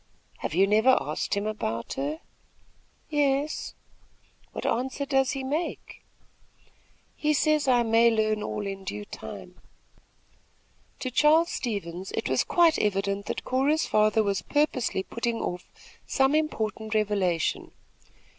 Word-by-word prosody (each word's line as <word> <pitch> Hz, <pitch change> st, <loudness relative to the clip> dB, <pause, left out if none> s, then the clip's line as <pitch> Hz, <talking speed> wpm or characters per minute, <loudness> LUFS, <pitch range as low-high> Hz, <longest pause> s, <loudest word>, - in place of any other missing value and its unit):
"Have -, -, -4 dB
you 190 Hz, +2 st, +5 dB
never 220 Hz, +6 st, +4 dB
asked -, -, -2 dB
him 200 Hz, +1 st, -2 dB
about 115 Hz, -, -3 dB
her?" 150 Hz, +4 st, -3 dB, 0.9 s
"Yes." 290 Hz, 0 st, 0 dB, 0.8 s
"What -, -, -6 dB
answer 260 Hz, +3 st, -1 dB
does 270 Hz, -1 st, +2 dB
he 270 Hz, -1 st, -4 dB
make?" 300 Hz, +6 st, -4 dB, 1.1 s
"He 305 Hz, 0 st, +1 dB
says 305 Hz, -1 st, +2 dB
I 245 Hz, -2 st, +4 dB
may 230 Hz, +1 st, +4 dB
learn 215 Hz, -1 st, +1 dB
all 210 Hz, 0 st, -4 dB
in 195 Hz, -1 st, -5 dB
due 205 Hz, +2 st, -5 dB
time." -, -, -10 dB, 1.4 s
To 255 Hz, -, -3 dB
Charles 310 Hz, +6 st, +4 dB
Stevens, 190 Hz, -6 st, -4 dB
it -, -, -2 dB
was 130 Hz, -1 st, +2 dB
quite 340 Hz, -2 st, +3 dB
evident 200 Hz, 0 st, -1 dB
that -, -, -3 dB
Cora's 275 Hz, +5 st, +1 dB
father 215 Hz, +1 st, +3 dB
was 200 Hz, -2 st, 0 dB
purposely 280 Hz, -9 st, 0 dB
putting 235 Hz, +2 st, -3 dB
off 180 Hz, 0 st, -5 dB, 0.4 s
some 270 Hz, +1 st, +2 dB
important 220 Hz, -8 st, -1 dB
revelation. 200 Hz, -6 st, 0 dB
225 Hz, 125 wpm, -27 LUFS, 200-275 Hz, 1.4 s, you